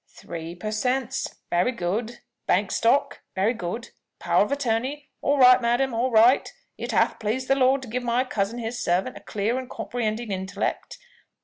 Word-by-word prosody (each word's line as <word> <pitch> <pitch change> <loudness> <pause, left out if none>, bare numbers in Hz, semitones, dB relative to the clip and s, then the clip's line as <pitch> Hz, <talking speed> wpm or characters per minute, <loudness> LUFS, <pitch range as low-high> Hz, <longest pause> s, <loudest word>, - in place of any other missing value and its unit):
"Three 165 0 -8
per 215 +5 -5
Cents 255 +3 -1 0.2
very 175 +8 +2
good. 220 +3 -3 0.3
Bank 195 +2 +2
Stock 240 +5 +1
very 200 +5 +2
good. 225 +3 -5 0.3
Power - - +3
of - - -4
Attorney. 275 +2 -2
All 285 +1 +2
right, 255 -1 +7
madam, 240 +2 +1
all 235 +3 +1
right. 235 +3 +5 0.2
It - - -5
hath - - +2
pleased 230 +4 -2
the - - +4
Lord 265 0 +3
to - - -8
give 250 +3 -3
my 240 +1 +1
cousin, 225 -3 -2
his 240 +1 -4
servant, 180 +3 0
a - - -8
clear 215 +6 -1
and 255 - -8
comprehending 225 -2 -3
intellect. 190 0 -3
235 Hz, 175 wpm, -25 LUFS, 210-255 Hz, 0.3 s, right